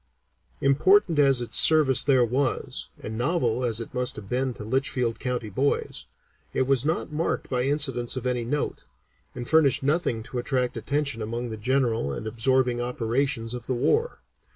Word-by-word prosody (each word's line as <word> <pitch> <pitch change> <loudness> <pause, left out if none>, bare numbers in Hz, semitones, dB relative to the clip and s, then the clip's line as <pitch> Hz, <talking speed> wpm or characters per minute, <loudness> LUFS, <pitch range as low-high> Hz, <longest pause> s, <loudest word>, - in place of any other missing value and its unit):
Important 160 +4 +3
as 135 -3 +4
its 120 - +2
service 150 -5 +5
there 130 -3 +4
was, 130 +2 -2
and 110 - -6
novel 125 -4 0
as 115 -2 0
it 115 - -7
must 125 -1 0
have 105 -2 -9
been 130 +4 -1
to - - -7
Litchfield 125 0 -1
County 125 -4 -3
boys, 135 +8 -1 0.5
it - - +1
was 135 -1 +1
not 155 +1 -2
marked 155 +3 -2
by 125 -1 0
incidents 135 -4 0
of 130 - -5
any 125 -1 0
note, 145 +5 -3 0.5
and 120 -1 -6
furnished 155 -5 +3
nothing 140 -6 0
to 125 +1 -5
attract 125 0 -1
attention 140 -4 -2
among 115 +2 -4
the - - -4
general 115 - 0
and - - -6
absorbing 120 +2 +1
operations 120 0 -1
of 120 -1 -7
the 130 - -1
war. 445 - 0
125 Hz, 170 wpm, -25 LUFS, 120-140 Hz, 0.5 s, service